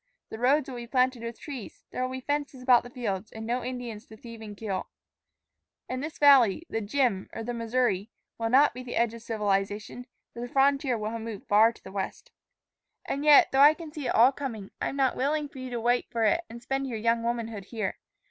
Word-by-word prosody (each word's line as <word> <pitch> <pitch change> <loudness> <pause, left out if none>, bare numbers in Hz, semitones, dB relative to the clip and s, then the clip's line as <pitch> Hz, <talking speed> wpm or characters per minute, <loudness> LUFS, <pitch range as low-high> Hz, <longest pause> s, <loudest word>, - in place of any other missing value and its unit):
The 220 - -6
roads 275 +4 +3
will 255 -2 -6
be 240 0 -7
planted 255 0 +1
with 230 0 -6
trees. 270 -8 -8
There - - -4
will 255 - 0
be 260 0 -5
fences 285 -2 -3
about 250 -2 +6
the 245 - -11
fields, 215 -5 -4
and 220 0 -7
no 245 +2 -1
Indians 245 -3 -6
to 220 - -13
thieve 230 -3 -11
and 210 -2 -9
kill. 195 -4 -3 1.0
And 255 0 -3
this 310 +2 -6
valley, 275 - +6
the 225 - -1
'Jim,' 215 -3 0
or 225 - -5
the 245 +2 -4
Missouri, 230 -3 0 0.3
will 225 0 0
not 275 +4 +5
be 250 - -7
the 250 -1 -6
edge 235 -1 +2
of 230 - -9
civilization, 210 +2 -2 0.3
for - - -9
the 240 - -4
frontier 275 -2 +2
will 215 0 -3
have 230 0 -5
moved 220 -3 -7
far 215 +3 +6
to - - -20
the 190 - -10
west. 195 -1 -5 0.7
"And 280 - -3
yet, 300 -1 +7
though 270 - +2
I 295 +2 +8
can 325 -2 -9
see 295 -3 -5
it - - 0
all 240 +4 +7
coming, 235 -8 -6
I - - 0
am - - -6
not 270 -2 +2
willing 295 +3 0
for 280 -2 -12
you 255 0 -6
to 240 -1 -3
wait 240 +2 +1
for 230 -1 -1
it 335 +10 +3
and 235 +1 -10
spend 270 +1 -2
your 235 -4 -4
young 230 +1 +1
womanhood 230 -3 -3
here. 215 -3 -4
240 Hz, 235 wpm, -28 LUFS, 225-265 Hz, 1.0 s, I